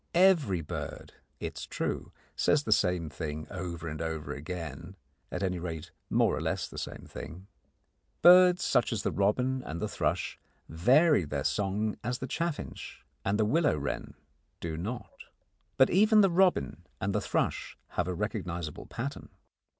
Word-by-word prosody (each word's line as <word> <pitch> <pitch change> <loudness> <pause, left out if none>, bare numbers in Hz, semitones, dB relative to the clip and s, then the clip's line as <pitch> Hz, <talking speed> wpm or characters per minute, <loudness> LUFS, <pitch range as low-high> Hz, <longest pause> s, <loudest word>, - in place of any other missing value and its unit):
Every 170 - +4
bird, 75 - -6 0.3
it - - -5
is - - -6
true, - - -3 0.2
says 145 -1 +3
the 110 - -3
same 90 -5 +3
thing 75 0 -5
over 85 -3 -5
and 75 0 -4
over 80 -3 -3
again 80 +2 -6 0.4
at - - -3
any 90 -2 0
rate, 85 -1 -5 0.2
more - - +3
or - - -3
less - - -1
the - - -7
same - - -6
thing. 90 +5 -9 0.8
Birds 180 0 +8
such 120 - +2
as 110 -3 -1
the - - 0
robin 125 +6 +1
and 85 -5 -5
the - - -1
thrush - - -1 0.3
vary 130 - +4
their 75 - -3
song 105 +2 0
as 125 +2 -1
the 130 - -4
chaffinch 170 +3 -4 0.2
and 100 +2 +1
the 110 - +3
willow 150 - +3
wren 70 -1 -4 0.4
do 80 -2 -4
not. 105 +9 -6 0.5
But 130 - +5
even 215 +3 +6
the 195 -2 +4
robin 175 - +2
and 100 +1 -1
the 105 - +1
thrush - - -1
have 90 - -1
a 90 - -1
recognisable 90 -6 -4
pattern. 135 +4 -5
100 Hz, 160 wpm, -30 LUFS, 85-130 Hz, 0.8 s, Birds